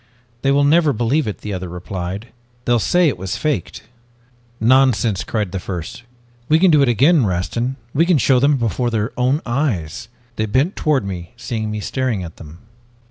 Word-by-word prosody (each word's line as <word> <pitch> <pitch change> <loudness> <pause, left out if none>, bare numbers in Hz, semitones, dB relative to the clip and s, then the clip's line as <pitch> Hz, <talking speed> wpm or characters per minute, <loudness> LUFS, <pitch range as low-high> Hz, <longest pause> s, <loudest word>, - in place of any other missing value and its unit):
"'They 135 - +1
will 140 +1 +3
never 155 +1 +4
believe 120 +5 0
it,' 105 - -5
the 105 - -5
other 90 -1 -5
replied. 90 +4 -6 0.4
'They'll 120 -1 +3
say 175 - +3
it 125 -11 -1
was 95 0 -3
faked.' 150 -7 -2 0.8
"'Nonsense!' 120 -4 +3
cried 105 -5 -2
the 95 - -3
first. 90 +3 -6 0.5
'We 155 - +5
can 180 +1 +4
do 150 -2 +5
it 135 - +3
again, 140 +6 +4
Rastin; 110 +7 -1 0.2
we 165 +4 +2
can 180 -4 +4
show 130 0 +3
them 140 +2 +3
before 120 +1 -1
their 110 0 -1
own 130 +5 +1
eyes!' 120 - -2 0.3
"They 110 - 0
bent 135 - +1
toward 145 -9 +1
me, 90 +1 -6
seeing 110 -2 -4
me 105 0 -4
staring 120 -2 -2
at 80 -2 -9
them. 80 0 -12
120 Hz, 185 wpm, -19 LUFS, 100-140 Hz, 0.8 s, We